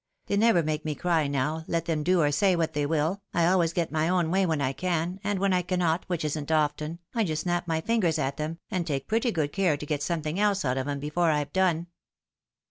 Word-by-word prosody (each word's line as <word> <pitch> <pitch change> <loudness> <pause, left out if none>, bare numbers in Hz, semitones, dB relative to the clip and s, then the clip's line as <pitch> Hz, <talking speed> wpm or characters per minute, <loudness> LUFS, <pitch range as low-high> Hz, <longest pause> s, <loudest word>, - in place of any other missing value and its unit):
They 200 - -1
never 205 -5 +4
make 155 0 -2
me 155 -1 -2
cry 165 -3 +1
now, 145 +3 -1
let 170 -1 -1
them 160 -3 -1
do 180 +3 +3
or 145 - +2
say 185 +6 +3
what 165 -2 -1
they 145 -1 0
will. 160 +5 0
I 170 -1 +3
always 175 -2 +3
get 170 -1 -1
my 160 +1 +1
own 175 -3 +1
way 190 0 +2
when 160 -3 0
I 135 -1 0
can, 175 +3 -2
and 205 0 0
when 195 0 +1
I 180 - +3
cannot, 175 -2 0
which 175 -4 -2
isn't 150 0 -3
often, 150 +1 0 0.2
I 230 - +1
just 155 -5 -2
snap 175 -1 -1
my 160 -1 0
fingers 180 -5 +1
at 135 -2 -2
them, 155 +2 -3
and 180 -3 -1
take 140 -3 -2
pretty 230 +3 +1
good 155 -6 -1
care 180 -7 +2
to 150 - -7
get 150 -1 -2
something 155 +2 -2
else 205 -3 +2
out 130 0 0
of 130 - -3
'em 145 -1 -2
before 150 +4 0
I've 150 -2 -1
done." 180 -3 +2
165 Hz, 245 wpm, -27 LUFS, 150-180 Hz, 0.2 s, never